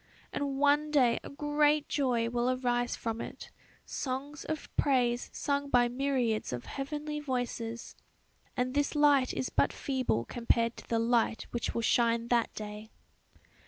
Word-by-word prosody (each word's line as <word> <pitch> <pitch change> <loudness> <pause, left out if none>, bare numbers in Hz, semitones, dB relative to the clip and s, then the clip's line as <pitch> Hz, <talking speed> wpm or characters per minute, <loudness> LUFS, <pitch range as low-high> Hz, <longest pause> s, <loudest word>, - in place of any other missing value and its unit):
And 280 -1 -2
one 290 +2 +3
day 255 -6 +3
a - - -8
great 295 +1 +2
joy 245 -5 +1
will 240 +1 0
arise 245 -1 0
from 225 0 -3
it;... - - -8 0.3
songs 280 +3 -4
of 310 -1 -5
praise 245 -3 +2
sung 280 -1 -1
by 245 -2 +4
myriads 250 -4 0
of 125 -1 -5
heavenly 300 +2 -4
voices;... 245 -4 -3 0.6
and 250 0 0
this 290 +2 0
light 290 -3 +4
is 255 - -3
but - - +2
feeble 255 - -1
compared 235 -1 +1
to - - -11
the 230 - +2
light 230 0 +1
which 240 - -2
will 230 - 0
shine 235 0 +2
that 235 -2 +2
day." 210 0 -7
255 Hz, 150 wpm, -31 LUFS, 235-285 Hz, 0.6 s, by